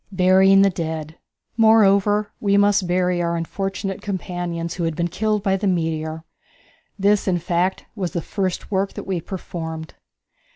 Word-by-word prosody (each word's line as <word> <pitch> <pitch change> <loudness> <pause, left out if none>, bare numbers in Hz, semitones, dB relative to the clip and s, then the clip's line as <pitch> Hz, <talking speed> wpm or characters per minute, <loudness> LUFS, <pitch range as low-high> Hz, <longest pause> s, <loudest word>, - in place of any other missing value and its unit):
Burying 190 +1 +5
the 195 - +4
Dead. 160 -2 -5 0.4
Moreover, 210 -2 +4
we 200 -1 +2
must 205 -2 +3
bury 180 0 +1
our 170 0 -1
unfortunate 195 +3 -4
companions 175 -4 -4
who 175 - -4
had 165 -1 -2
been 170 +2 -1
killed 210 +3 -1
by 195 -2 +2
the 200 +1 -1
meteor. 160 -3 -1 0.7
This, 205 +1 +2
in 180 -2 +2
fact, 175 +2 -1
was 190 -5 -2
the 170 - -1
first 190 -2 -3
work 195 0 0
that - - -7
we 185 -3 -2
performed. 160 -3 -6
185 Hz, 155 wpm, -21 LUFS, 170-200 Hz, 0.7 s, Burying